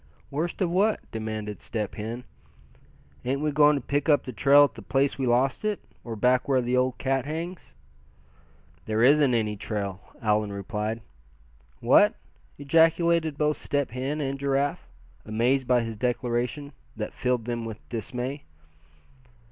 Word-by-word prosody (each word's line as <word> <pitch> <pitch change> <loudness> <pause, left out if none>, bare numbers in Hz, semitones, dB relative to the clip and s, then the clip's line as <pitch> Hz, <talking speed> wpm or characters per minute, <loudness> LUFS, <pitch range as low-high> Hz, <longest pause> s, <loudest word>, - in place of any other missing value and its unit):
"Worst 160 +7 -3
of 175 -3 +1
what?" 205 +4 +2
demanded 110 -2 -5
Step 105 -3 -3
Hen. 115 +3 -5 1.0
"Ain't 135 +2 -1
we 150 0 0
going 150 +1 +5
to 140 - -2
pick 145 +3 0
up 145 - +4
the 130 - -7
trail 140 +5 +6
at 140 -5 +1
the 115 - -10
place 135 +7 0
we 130 - 0
lost 125 - +2
it, 210 -1 -1 0.2
or 115 -2 -5
back 125 +4 +2
where 135 -2 +3
the 125 0 0
old 125 0 +1
cat 135 -1 0
hangs?" 165 +4 -6 1.1
"There 110 +1 +1
isn't 140 -1 +5
any 105 -2 0
trail!" 100 -2 -4 0.2
Allan 105 -1 +1
replied. 105 +2 -3 0.8
"What?" - - +5 0.4
ejaculated 165 +1 +3
both 150 0 +1
Step 145 -3 -1
Hen 135 +5 -3
and 135 -1 -3
Giraffe, 140 +1 0 0.4
amazed 120 +4 +1
by 125 -1 +4
his 115 -1 -5
declaration, 125 +4 -2 0.2
that 105 - -4
filled 125 -3 -1
them 120 -1 -3
with 110 -1 -8
dismay. 125 +4 -4
130 Hz, 150 wpm, -26 LUFS, 115-145 Hz, 1.1 s, trail